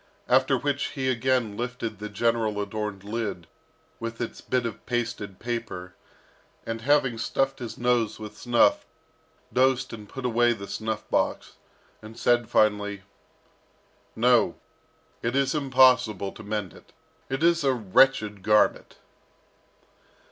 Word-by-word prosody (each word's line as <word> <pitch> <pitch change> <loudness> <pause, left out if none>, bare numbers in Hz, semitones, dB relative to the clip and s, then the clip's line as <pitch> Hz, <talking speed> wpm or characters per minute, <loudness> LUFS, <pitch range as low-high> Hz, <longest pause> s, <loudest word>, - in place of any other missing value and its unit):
After 130 +1 +4
which 140 +1 -1
he 130 -1 0
again 125 -3 0
lifted 115 -3 -4
the 105 0 -5
general 110 0 0
adorned 105 -1 -4
lid 105 -5 -4 0.5
with 115 0 -5
its 120 - -5
bit 125 -2 -1
of 115 - -5
pasted 115 -5 -3
paper, 110 -7 -5 0.7
and 115 0 -4
having 135 -2 +2
stuffed 135 +3 -1
his 115 -2 -6
nose 120 -3 +1
with 105 -1 -9
snuff, 120 -1 +3 0.7
dosed 130 0 +2
and 105 -3 -9
put 135 -1 -7
away 120 0 +3
the 100 -3 -8
snuff 110 -1 -4
box, - - 0 0.5
and 110 +1 -12
said 120 -1 +2
finally, 105 -2 +1 1.1
"No, 120 +1 +3 0.7
it 120 +2 -1
is 135 -1 +2
impossible 130 - +3
to - - -12
mend 105 -4 -4
it. - - -18 0.4
It 135 +3 -2
is 170 -1 +3
a 135 - +3
wretched 110 -1 +3
garment!" 105 +2 +2
115 Hz, 130 wpm, -26 LUFS, 105-130 Hz, 1.1 s, After